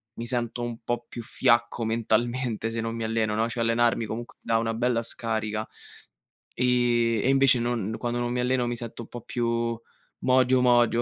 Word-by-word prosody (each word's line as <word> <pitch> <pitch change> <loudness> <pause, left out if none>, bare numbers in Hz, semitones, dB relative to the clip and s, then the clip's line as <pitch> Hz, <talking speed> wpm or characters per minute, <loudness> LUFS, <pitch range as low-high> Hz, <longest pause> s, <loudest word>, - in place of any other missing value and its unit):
mi 115 - -5
sento 120 0 -1
un 120 -1 -4
po' 120 +1 -2
più 120 - -7
fiacco 115 0 +2
mentalmente 115 +1 0
se 115 0 -2
non 115 0 -3
mi 115 - -4
alleno, 110 -1 0
no, 115 +1 +1
cioè 115 0 -2
allenarmi 115 0 +2
comunque 115 +3 -6
dà 115 - +1
una 115 0 -1
bella 120 0 +1
scarica 110 -2 -2 0.9
e 120 -2 +2
e - - +2
invece 135 -2 +5
non 115 -3 -1
quando 120 0 -2
non 120 0 -1
mi 125 - -1
alleno 125 0 +1
mi 120 - -2
sento 115 0 -7
un - - -13
po' 120 - -8
più 115 0 -1 0.4
mogio, 130 0 +3
mogio, 120 -1 +4
120 Hz, 185 wpm, -26 LUFS, 115-120 Hz, 0.9 s, invece